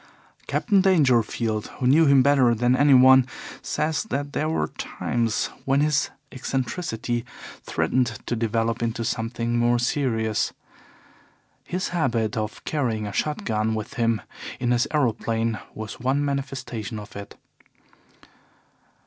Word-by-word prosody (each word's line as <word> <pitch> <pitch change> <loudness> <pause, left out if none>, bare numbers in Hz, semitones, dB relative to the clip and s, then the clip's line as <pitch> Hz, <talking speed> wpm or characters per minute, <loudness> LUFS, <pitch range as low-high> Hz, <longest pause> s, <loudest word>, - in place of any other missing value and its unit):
Captain 200 -4 +2
Dangerfield, 120 - +2
who 130 - -2
knew 150 +5 +5
him 140 -2 +6
better 130 -4 +4
than 120 +2 +2
anyone, 130 -2 +6 0.3
says 155 0 -1
that 145 -7 -3
there 155 - 0
were 75 - 0
times 115 -2 -2
when 135 +1 +2
his 150 -1 +2 0.2
eccentricity 125 -2 -3 0.4
threatened 125 -1 0 0.2
to 120 - -1
develop 115 +1 -1
into 115 0 -2
something 115 +1 -1
more 120 +1 +3
serious. 120 -3 0 1.1
His 185 +1 -2
habit 120 -10 0
of 110 -1 -4
carrying 120 -8 -1
a 100 - -5
shot 150 +6 -2
gun 110 0 0
with 110 -1 -5
him 115 -2 0 0.4
in 120 -1 0
his 120 +3 +2
aeroplane 115 -5 0 0.2
was 110 -1 -7
one 135 +4 +1
manifestation 130 -6 -4
of 105 -1 -10
it. 100 0 -8
120 Hz, 125 wpm, -24 LUFS, 115-140 Hz, 1.1 s, him